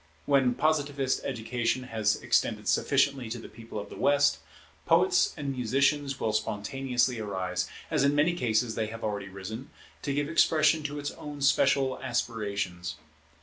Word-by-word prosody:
When 135 -3 +3
Positivist 145 -3 +1
education 120 0 -1
has 110 -4 0
extended - - +1
sufficiently 135 -5 +2
to 120 - -4
the 115 - -9
People 115 0 -10
of 105 - -6
the - - -8
West, 145 0 +3 0.5
poets - - +4
and 140 -1 -3
musicians 135 +3 +1
will 110 - 0
spontaneously 120 +3 0
arise, 95 -4 -2 0.2
as 150 -4 +2
in 140 +1 +3
many 155 +4 +3
cases 115 -7 0
they 110 -1 -1
have 115 +1 -8
already 100 -2 -3
risen, 105 +7 -7 0.3
to 145 - -2
give 145 +1 0
expression 155 -1 +3
to 145 0 -3
its 145 0 -3
own 145 -1 -8
special 135 -1 +3
aspirations. 100 -8 -2
125 Hz, 150 wpm, -28 LUFS, 110-140 Hz, 0.5 s, poets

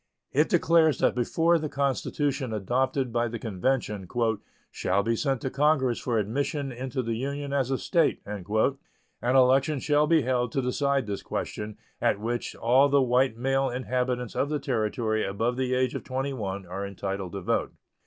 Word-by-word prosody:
It 150 +4 +3
declares 165 -4 +4
that - - +2
before 165 +7 +2
the 155 -1 -3
constitution 140 -1 -1
adopted 130 +4 0
by 120 0 +1
the 115 +1 -4
convention 105 -2 -2 0.6
"shall 100 +2 0
be 115 +2 +1
sent 135 +1 -1
to 130 - -3
Congress 140 -4 +2
for 120 -3 -1
admission 135 +6 -1
into 130 +1 -3
the 115 0 -2
Union 140 +4 -3
as 135 -3 +1
a 135 - +1
State" 165 +1 +1
an 105 -2 -6 0.8
election 130 +4 +4
shall 150 +2 +2
be 160 -2 +4
held 125 -2 0
to 135 - +1
decide 140 +1 +1
this 100 -1 -4
question, 105 0 -5 0.2
at 100 - +2
which 120 +2 -3
all 130 +5 +4
the 140 0 +4
white 125 -1 +2
male 135 +2 +1
inhabitants 125 -1 -2
of 140 - 0
the 150 - 0
Territory 110 -4 -1
above 110 +5 -1
the 130 0 0
age 130 0 +1
of - - -4
21 130 -8 -3
are 95 +3 -5
entitled 100 -1 -4
to 100 - -4
vote. - - -1
130 Hz, 170 wpm, -27 LUFS, 115-140 Hz, 0.8 s, declares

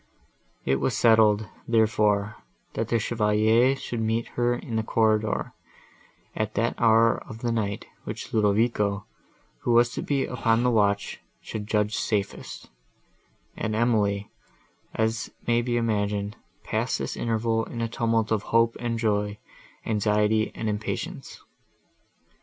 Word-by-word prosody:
It 65 0 +2
was 130 - 0
settled, 110 -2 +4 0.2
therefore, 105 -2 +2 0.4
that 115 - -2
the 115 - +2
Chevalier 110 +3 +3
should 120 -3 -4
meet 110 +1 -1
her 120 0 +1
in 120 -1 -6
the 110 - +2
corridor, 110 -1 +1 0.8
at 110 0 -2
that 115 +2 +1
hour 115 0 +4
of 110 +1 -9
the 120 - 0
night, 105 -3 -2 0.2
which - - -7
Ludovico, 105 -1 +1 0.5
who 120 - 0
was 120 +1 +5
to - - -4
be 140 -2 0
upon 115 -1 +1
the 125 - +3
watch, 100 -2 +1 0.2
should 105 -2 -6
judge 105 -1 +1
safest: 100 -2 -3 0.8
and 110 0 -2
Emily, 105 -3 +1 0.6
as 110 0 0 0.2
may 120 0 +2
be 120 0 -1
imagined, 105 -3 -1 0.3
passed - - -1
this - - -4
interval 115 0 0
in 120 - -7
a 115 - 0
tumult 115 -2 0
of 110 -2 +2
hope 115 0 +3
and 120 -1 -2
joy, 105 -2 0 0.5
anxiety 105 0 +1
and 110 - -3
impatience. 105 0 -4
110 Hz, 135 wpm, -26 LUFS, 105-115 Hz, 0.8 s, was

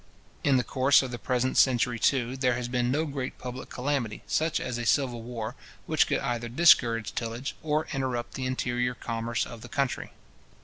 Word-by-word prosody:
In 140 -2 +4
the 125 - +2
course 135 +2 +4
of 130 - -5
the 120 - -5
present 125 +1 +1
century, 125 -2 +3
too, 130 -1 +1
there 130 -2 +1
has 120 0 -3
been 120 0 0
no 150 +5 +1
great 135 -3 -4
public 125 +1 -7
calamity, 125 -5 -2
such 160 +1 0
as 120 -1 -3
a - - -2
civil 125 -2 +1
war, 115 -2 -5 0.3
which - - +3
could - - 0
either 120 -1 -2
discourage 115 -7 +4
tillage, 115 +3 -4
or 155 0 0
interrupt 130 -3 -2
the 130 -1 -3
interior 125 -1 -1
commerce 115 0 -2
of 115 -1 -10
the - - -10
country. 140 -2 -1
125 Hz, 185 wpm, -28 LUFS, 120-135 Hz, 0.3 s, In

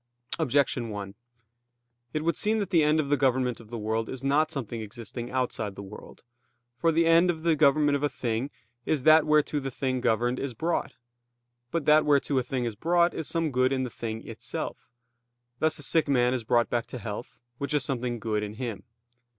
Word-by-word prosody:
Objection 135 -5 +1
1: 100 -2 -6 1.0
It 155 +3 -2
would 170 -1 +1
seem 215 +5 +1
that 200 -3 -2
the 170 -4 +5
end 150 +1 +3
of 145 -3 -1
the 145 - +3
government 130 -3 +1
of 115 -2 -14
the 120 - -5
world 110 +1 -2
is 130 0 -6
not 145 +3 +2
something 120 -4 -4
existing 115 +3 -7
outside 120 -6 -2
the 100 - -8
world. 100 +2 -12 0.5
For 165 +5 +2
the 165 +1 +3
end 165 +2 +5
of 160 -2 -2
the 165 -1 +3
government 145 0 +4
of 140 - -1
a 145 - +1
thing 120 0 -2 0.3
is 145 -2 0
that 155 0 +6
whereto 150 -1 +3
the 135 -1 -4
thing 130 -1 -2
governed 120 +3 +1
is 135 -4 -4
brought. 165 +8 -2 0.7
But 165 -1 -2
that 155 0 +6
whereto 140 -2 +2
a - - +1
thing 125 0 -2
is 115 - -2
brought 170 +8 +2
is 160 - -4
some 165 -2 0
good 130 0 +2
in 130 -1 0
the 125 - -4
thing 110 -1 -6
itself; - - -5 0.7
thus 155 0 +2
a 145 - -7
sick 160 +3 +2
man 125 -3 +3
is 125 -3 -2
brought 120 +1 +2
back 120 -1 -1
to - - -7
health, 110 +1 -7 0.2
which 140 - -3
is 145 - +2
something 125 -2 -2
good 110 -1 -1
in 105 0 -5
him. 115 -3 -5
130 Hz, 205 wpm, -27 LUFS, 120-155 Hz, 1.0 s, that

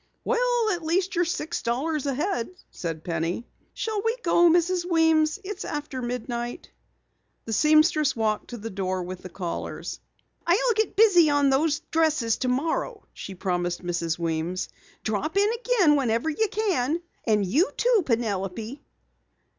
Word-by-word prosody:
"Well, 485 -2 +1
at 350 - -3
least 360 +4 0
you're 350 -1 +2
six 340 0 -3
dollars 280 +5 -1
ahead," 280 - -1 0.2
said 165 -2 -5
Penny. 170 +6 -2 0.3
"Shall 435 -2 -2
we 455 +3 0
go, 345 0 +5
Mrs. 350 +1 +2
Weems? 320 -2 +3
It's 410 +2 -5
after 295 -3 -4
midnight." 240 0 -4 0.7
The 225 - -3
seamstress 305 - +4
walked 215 -2 -1
to 240 - -6
the 225 +1 -6
door 185 -1 -2
with 180 +1 -7
the 185 - -9
callers. 175 -1 -5 0.5
"I'll 345 +2 +5 0.2
get 440 +1 0
busy 400 -6 +6
tomorrow 290 -1 +3
on 280 - +5
those 295 +3 +2
new - - -39
dresses," 310 -9 +2 0.7
she 195 - -8
promised 175 -1 -2
Mrs. 170 -2 -1
Weems. 170 +2 -2 0.3
"Drop 220 - -2
in 410 +2 +4
again 460 -10 +3
whenever 250 +2 +1
you 440 +9 +1
can. 345 - 0 0.2
And 210 -2 +3
you, 300 - +2
too, 480 -3 +3
Penelope." 225 - -2
290 Hz, 145 wpm, -25 LUFS, 210-345 Hz, 0.7 s, busy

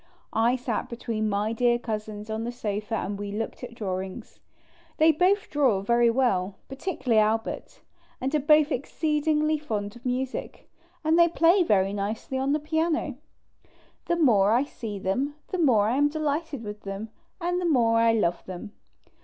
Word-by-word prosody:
I 230 +3 +3
sat 245 -3 -3
between 225 -2 -2
my 205 +2 0
dear 240 +1 +3
Cousins 215 -2 -5
on 220 +1 -2
the 240 - -3
sofa 215 -2 -3
and 200 -2 -3
we 205 0 -4
looked 225 +4 -4
at 240 -1 -7
drawings. 190 -3 -5 0.6
They 320 +1 +6
both 370 +6 +2
draw 265 -10 +2
very 235 +3 +3
well, 205 -6 +1
particularly 270 - 0
Albert, 220 +1 -2 0.4
and 265 +3 -2
are 305 - +3
both 300 +2 +4
exceedingly 305 +2 0
fond 210 -7 -4
of 240 - -14
music; 255 +1 -3 0.4
and 320 +2 +3
they 340 - +7
play 340 +3 +4
very 195 - +2
nicely 215 +6 -3
on 270 +1 0
the 300 - +2
piano. 315 +2 0 0.9
The 345 - +1
more 220 - +4
I 245 +3 +3
see 225 -7 -6
them 255 +10 -1
the 370 - -2
more 230 -10 +4
f 235 - +1
am 290 0 +4
delighted 305 -3 -2
with 210 0 -7
them, 195 +2 -6 0.3
and 355 +1 -1
the - - -1
more 230 -5 +3
I 230 0 +5
love 175 -6 0
them. 185 +3 -7
240 Hz, 170 wpm, -26 LUFS, 210-300 Hz, 0.9 s, they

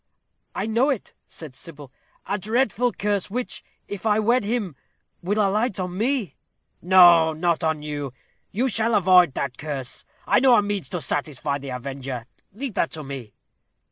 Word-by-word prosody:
"I - - -2
know 230 +6 +2
it," 265 -7 -3
said 155 -5 -10
Sybil; 145 -1 -10 0.3
"a 205 - -2
dreadful 235 +3 +1
curse, 205 -2 -1
which, 245 +4 -4 0.2
if 205 -2 -6
I 215 -2 +3
wed 235 +3 +2
him, 205 - -2 0.5
will 200 +4 -1
alight 210 +1 +1
on 180 -1 -3
me." 230 - -1 0.4
"No; 175 -3 +7
not 170 +1 0
on 160 -2 0
you; 145 -3 -4 0.4
you 245 +6 0
shall 225 -1 +1
avoid 180 -6 +5
that 135 -2 -3
curse. 140 -4 -5 0.2
I - - +4
know 255 -1 +6
a 210 - +4
means 200 -8 -3
to 180 - -4
satisfy 145 0 -2
the 140 0 -8
avenger. 130 -1 -5 0.3
Leave 245 +4 -5
that 165 - 0
to 155 - -5
me." 135 -6 -8
185 Hz, 165 wpm, -24 LUFS, 150-215 Hz, 0.5 s, No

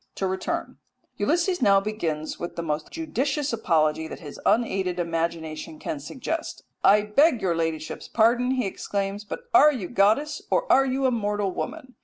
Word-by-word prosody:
To 195 - -2
return 190 0 -3 0.4
Ulysses 350 -1 +1
now 200 -4 +5
begins 170 -7 -3
with 175 - -5
the 170 - -3
most 155 -1 -3
judicious 290 -3 -2
apology 160 -7 +1
that - - -8
his 150 -4 -10
unaided 190 -6 +1
imagination 165 -2 -3
can 150 - -4
suggest. 265 - -5 0.2
"I 205 +1 +6
beg 245 +6 +3
your 185 -4 0
ladyship's 160 -1 -3
pardon," 235 +2 +3
he 255 -2 0
exclaims, 200 +1 -3
"but 210 - -6
are 300 - +8
you 230 -11 -4
goddess 240 +9 +2
or - - +2
are 270 0 +5
you 265 +1 0
a 260 - +3
mortal 205 -3 -1
woman? 260 - -6
205 Hz, 165 wpm, -25 LUFS, 170-260 Hz, 0.4 s, are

